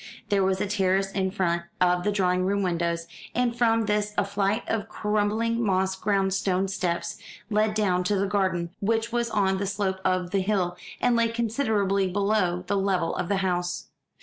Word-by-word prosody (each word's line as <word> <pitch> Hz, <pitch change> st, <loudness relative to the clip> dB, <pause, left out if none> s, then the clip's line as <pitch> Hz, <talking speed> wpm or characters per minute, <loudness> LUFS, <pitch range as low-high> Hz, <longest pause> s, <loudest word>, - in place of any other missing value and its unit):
There 200 Hz, -2 st, +3 dB
was 190 Hz, 0 st, +1 dB
a -, -, 0 dB
terrace 195 Hz, -1 st, +1 dB
in 190 Hz, -1 st, 0 dB
front 175 Hz, -3 st, 0 dB, 0.2 s
of 180 Hz, -1 st, +3 dB
the 210 Hz, -, +1 dB
drawing 185 Hz, -2 st, +1 dB
room 200 Hz, +2 st, +1 dB
windows, 170 Hz, -2 st, -1 dB, 0.3 s
and 245 Hz, -1 st, +1 dB
from 230 Hz, -2 st, +2 dB
this 210 Hz, 0 st, 0 dB
a -, -, +2 dB
flight 200 Hz, +2 st, 0 dB
of 220 Hz, -2 st, -2 dB
crumbling 215 Hz, +2 st, 0 dB
moss 190 Hz, -2 st, +1 dB
grown 195 Hz, -1 st, +1 dB
stone 190 Hz, 0 st, 0 dB
steps 170 Hz, -3 st, -2 dB, 0.3 s
led 215 Hz, 0 st, +2 dB
down 185 Hz, -4 st, +2 dB
to 205 Hz, -, +1 dB
the 195 Hz, 0 st, +1 dB
garden, 185 Hz, -4 st, 0 dB
which 225 Hz, +2 st, 0 dB
was 235 Hz, 0 st, 0 dB
on 195 Hz, -3 st, +1 dB
the 200 Hz, -, -1 dB
slope 195 Hz, -1 st, -1 dB
of 185 Hz, -1 st, 0 dB
the 195 Hz, -, +1 dB
hill, 185 Hz, -3 st, 0 dB, 0.2 s
and 245 Hz, -1 st, +3 dB
lay 230 Hz, 0 st, +3 dB
considerably 220 Hz, -5 st, 0 dB
below 195 Hz, -3 st, +1 dB
the 200 Hz, +2 st, 0 dB
level 190 Hz, -4 st, 0 dB
of 180 Hz, -, -3 dB
the 200 Hz, -, +2 dB
house. 175 Hz, -1 st, -2 dB
195 Hz, 185 wpm, -26 LUFS, 185-210 Hz, 0.3 s, There